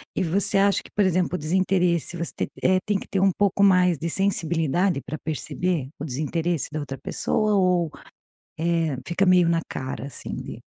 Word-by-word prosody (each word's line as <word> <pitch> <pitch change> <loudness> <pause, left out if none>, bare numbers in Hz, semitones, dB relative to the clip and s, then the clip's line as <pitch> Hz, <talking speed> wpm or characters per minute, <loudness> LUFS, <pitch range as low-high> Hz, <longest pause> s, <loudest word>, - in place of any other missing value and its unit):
E - - +1
você 185 +3 +1
acha 200 0 +3
que, - - -14
por 205 -2 +3
exemplo, 180 0 +1
o - - 0
desinteresse, 175 +1 +1
você 170 0 -3
te - - -2 0.2
eh, 185 0 +4
tem 205 - +2
que - - -10
ter 195 - 0
um 195 0 +4
pouco 200 0 +2
mais 180 -3 +5
de 170 - -2
sensibilidade 175 -3 0
pra 155 - -5
perceber 160 -1 -2
o 150 - -4
desinteresse 160 +4 -2
da 155 - -3
outra 135 -2 -5
pessoa? 215 -1 0
Ou, 180 -4 +2 0.7
eh, 165 -3 0
fica 180 +3 +1
meio 180 -2 +5
na 165 0 +2
cara 130 -2 -5
assim 140 - -7
de - - -8
175 Hz, 190 wpm, -24 LUFS, 160-190 Hz, 0.7 s, mais